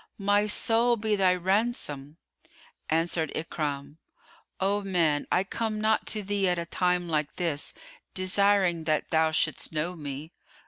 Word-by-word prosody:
My 205 +1 +2
soul 230 +3 +2
be 215 -1 0
thy 185 -2 +3
ransom!" 180 - -1 0.7
Answered 165 -1 +1
Ikrimah, 145 -2 -4 0.6
"O 200 +2 +1
man 170 -7 +1
I 180 - +3
come 215 +2 -3
not 220 +1 +1
to 215 -2 -2
thee 200 0 0
at 180 - +1
a 170 - -3
time 180 0 0
like 150 -2 -1
this 165 -5 -2 0.4
desiring 185 -3 +2
that 155 -1 0
thou 160 0 +3
shouldst 160 - -1
know 160 +3 -2
me." 145 0 -7
180 Hz, 140 wpm, -27 LUFS, 160-205 Hz, 0.7 s, thy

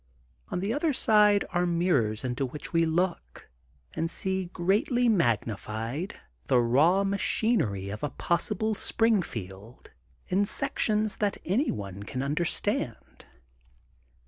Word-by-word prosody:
On 180 - -2
the 205 +4 -1
other 300 +1 0
side 210 -5 +4
are 175 0 +1
mirrors 155 -12 +1
into 125 +1 -2
which 135 +6 -5
we 165 0 +3
look 170 - -2 0.4
and 165 +1 -2
see 190 +1 -1
greatly 210 - +1
magnified 120 - -1 0.3
the 125 - +3
raw 150 +11 +3
machinery 195 - +1
of 105 +2 -6
a 145 - -1
possible 210 +9 0
Springfield 120 - -1 0.4
in 200 +2 +1
sections 215 -4 0
that 205 -1 0
any 235 - +1
one 100 -1 -5
can 125 +6 -4
un 140 +1 -1
derstand. 170 +2 -2
175 Hz, 120 wpm, -27 LUFS, -, 0.4 s, side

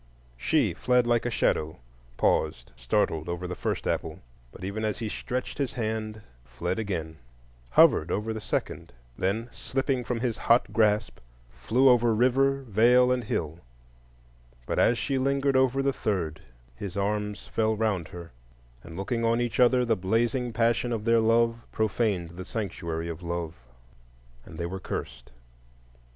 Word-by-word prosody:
She - - +1
fled 125 -1 +2
like 120 0 +1
a - - 0
shadow, 80 -8 0 0.4
paused, 65 -6 0
startled 75 +6 0
over 85 +1 -3
the 90 - -4
first - - -3
apple, - - -2 0.3
but 95 - -12
even 100 +3 -3
as 110 -1 -1
he 115 - -3
stretched 125 +6 -4
his 135 -4 -1
hand, 110 -2 -3 0.2
fled 85 - -3
again; 85 -7 -4 0.5
hovered 75 +5 +5
over 110 +2 -1
the 110 - -5
second, - - -3 0.2
then, 105 +8 -1
slipping 135 -1 -2
from 120 -1 -2
his 120 -3 -1
hot 120 +2 +3
grasp, 105 -1 +2 0.3
flew 110 - +2
over 120 -3 +5
river, 135 +3 +2
vale, 125 +3 +4
and 125 -2 0
hill; 80 -5 -3 1.1
but - - -1
as 120 - +4
she 135 +1 -1
lingered 140 +1 +1
over 130 +1 +3
the 135 0 +1
third, 85 - -2 0.3
his 95 +7 -6
arms 105 +1 -2
fell 110 -1 0
round 105 -6 -1
her, 85 -1 -10 0.5
and 85 0 -10
looking 115 +4 -2
on 115 +1 +2
each 120 0 -2
other, 125 0 +5
the 115 -1 +2
blazing 115 +6 0
passion 115 +1 +1
of 110 -2 -3
their 115 0 +4
love 115 +1 +3
profaned 105 -5 0
the 90 +2 -8
sanctuary 85 -6 -4
of 85 0 -6
Love, 85 -2 -3 0.9
and 80 - -11
they 85 - -3
were 95 +3 -4
cursed. - - -6
110 Hz, 155 wpm, -27 LUFS, 90-120 Hz, 1.1 s, hovered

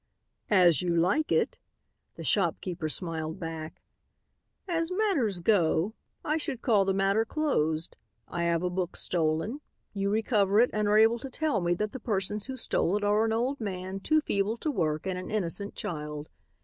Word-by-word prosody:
"As 180 -5 +5
you 175 -1 0
like 180 - +2
it," - - +1 0.6
the - - -8
shopkeeper 175 -4 0
smiled 160 0 -3
back. 165 -2 -6 0.8
"As 330 -1 -1
matters 320 - +1
go, 175 0 +2 0.3
I 305 +2 +1
should 285 -6 -4
call 210 -6 +4
the 195 - +1
matter 195 +3 +2
closed. 170 - -1 0.3
I 170 0 -2
have 170 0 +1
a 180 - +1
book 180 -1 -2
stolen. 170 - -1 0.3
You 200 -1 -1
recover 210 -1 +2
it 245 - +4
and 210 -1 +1
are 210 +1 +4
able 225 +2 +5
to 270 - -7
tell 300 -5 0
me 175 0 +1
that 210 +3 -2
the 260 - -6
persons 210 -1 -2
who 265 -1 -5
stole 205 -4 +1
it 210 - -4
are 210 +2 +3
an 225 - 0
old 245 +4 -1
man, 190 -2 -4
too 310 +10 +2
feeble 205 -3 0
to 305 - -2
work, 155 - -1
and 185 -1 -2
an 185 - -7
innocent 200 0 -2
child. 150 -7 -5
200 Hz, 175 wpm, -29 LUFS, 170-225 Hz, 0.8 s, As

